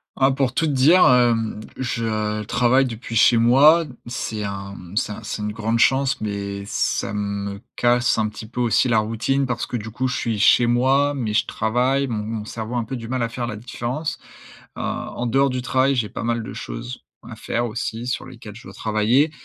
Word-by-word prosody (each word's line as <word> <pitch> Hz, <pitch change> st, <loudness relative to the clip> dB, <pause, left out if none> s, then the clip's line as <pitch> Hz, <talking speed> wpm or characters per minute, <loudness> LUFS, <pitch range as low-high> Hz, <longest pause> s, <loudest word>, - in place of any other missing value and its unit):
Ah, 135 Hz, 0 st, +3 dB
pour 135 Hz, -2 st, 0 dB
tout 165 Hz, -, +1 dB
te 150 Hz, -, 0 dB
dire, 150 Hz, +8 st, +5 dB
hem, 115 Hz, -4 st, +2 dB, 0.2 s
je 110 Hz, -3 st, -2 dB
travaille 125 Hz, +5 st, +3 dB
depuis 115 Hz, -1 st, -6 dB
chez 115 Hz, +2 st, +5 dB
moi. 145 Hz, +8 st, +6 dB, 0.2 s
C'est 110 Hz, -3 st, -4 dB
un, 100 Hz, 0 st, -5 dB
mmh, 90 Hz, +2 st, -10 dB
c'est 110 Hz, -, 0 dB
un 115 Hz, -, -10 dB
c'est 105 Hz, -, -5 dB
une 105 Hz, -, -2 dB
grande 115 Hz, +1 st, -1 dB
chance, 135 Hz, +1 st, +3 dB
mais 100 Hz, -1 st, -4 dB
ça 105 Hz, -, -1 dB
me 100 Hz, -1 st, -3 dB
casse 120 Hz, 0 st, +2 dB
un 110 Hz, -1 st, +1 dB
petit 110 Hz, +1 st, -9 dB
peu 125 Hz, +2 st, -7 dB
aussi 120 Hz, +1 st, +2 dB
la 115 Hz, -, +3 dB
routine 115 Hz, +6 st, 0 dB
parce 125 Hz, -1 st, -2 dB
que 125 Hz, -, -3 dB
du 110 Hz, 0 st, -7 dB
coup, 125 Hz, +4 st, -1 dB
je 125 Hz, -2 st, -2 dB
suis 110 Hz, -2 st, -2 dB
chez 120 Hz, +3 st, +5 dB
moi, 135 Hz, +4 st, +3 dB
mais 120 Hz, -7 st, -3 dB
je 105 Hz, -, +2 dB
travaille, 125 Hz, +5 st, 0 dB
mon 110 Hz, -4 st, -3 dB
mon 110 Hz, 0 st, -4 dB
cerveau 110 Hz, +2 st, -5 dB
a -, -, +1 dB
un -, -, -1 dB
peu 120 Hz, +4 st, -5 dB
du 115 Hz, -1 st, -8 dB
mal 130 Hz, +1 st, -2 dB
à 115 Hz, -, -1 dB
faire 120 Hz, 0 st, -4 dB
la 110 Hz, -, -4 dB
différence. 125 Hz, +6 st, -4 dB, 0.6 s
Heu, -, -, -7 dB
en 120 Hz, -, -4 dB
dehors 135 Hz, +3 st, +2 dB
du 125 Hz, 0 st, -3 dB
travail, 130 Hz, +2 st, +2 dB
j'ai 115 Hz, -4 st, 0 dB
pas -, -, -6 dB
mal 115 Hz, 0 st, -1 dB
de 110 Hz, -, -7 dB
choses -, -, -7 dB, 0.3 s
à -, -, -8 dB
faire 120 Hz, +1 st, -2 dB
aussi 115 Hz, 0 st, -4 dB
sur 125 Hz, -, -2 dB
lesquelles 115 Hz, -5 st, -11 dB
je 120 Hz, -, -12 dB
dois -, -, -11 dB
travailler 110 Hz, +7 st, +2 dB
120 Hz, 220 wpm, -22 LUFS, 110-130 Hz, 0.6 s, moi